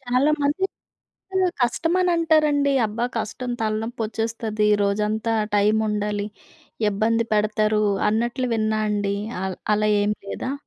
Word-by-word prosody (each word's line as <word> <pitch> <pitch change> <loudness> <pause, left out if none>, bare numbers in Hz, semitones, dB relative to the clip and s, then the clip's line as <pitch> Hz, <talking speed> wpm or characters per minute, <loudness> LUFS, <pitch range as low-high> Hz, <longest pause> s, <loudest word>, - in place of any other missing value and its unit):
చాలామంది 285 +6 +1 1.0
కష్టమనంటారండి. 315 0 +2
అబ్బా! 220 +3 -2
కష్టం, 235 +3 -4
తలనొప్పొచ్చేస్తది, 220 -1 -2 0.2
రోజంతా 210 +3 0 0.2
టైముండాలి, 210 0 +1 0.6
ఇబ్బంది 225 +3 +1
పెడతారు 215 0 +2 0.3
అన్నట్లు 240 +3 0
విన్నా 215 -1 0
అండీ. 205 -1 0 0.3
ఆహ్, 190 -1 -3 0.2
అలా 215 0 +2
ఏం 210 - +1
లేదా? 255 - -4
220 Hz, 90 wpm, -23 LUFS, 210-255 Hz, 1.0 s, కష్టమనంటారండి